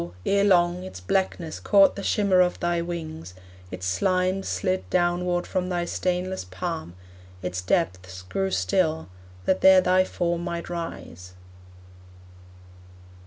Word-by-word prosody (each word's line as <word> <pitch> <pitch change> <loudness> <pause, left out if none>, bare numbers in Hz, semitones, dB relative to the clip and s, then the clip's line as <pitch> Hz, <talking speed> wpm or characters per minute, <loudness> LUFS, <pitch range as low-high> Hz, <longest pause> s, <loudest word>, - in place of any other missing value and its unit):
ere 200 0 +3
long, 175 -2 +3
Its 140 - -8
blackness 165 - -2
caught 200 -2 +5
the 200 - -5
shimmer 195 -2 +3
of 180 0 +1
thy 175 0 0
wings, 160 - -6 0.3
Its 90 0 -6
slimes 185 - 0
slid 185 -1 -2
downward 175 0 +1
from 180 0 -2
thy 175 -1 -1
stainless 180 +1 -2
palm, 90 -2 -5 0.5
Its 90 0 -3
depths 90 0 -1
grew 190 - -2
still, 160 - 0 0.4
that 190 - +1
there 190 0 +8
thy 185 0 +3
form 175 -2 -2
might 170 0 -5
rise. 90 - -7
175 Hz, 125 wpm, -25 LUFS, 155-185 Hz, 0.5 s, there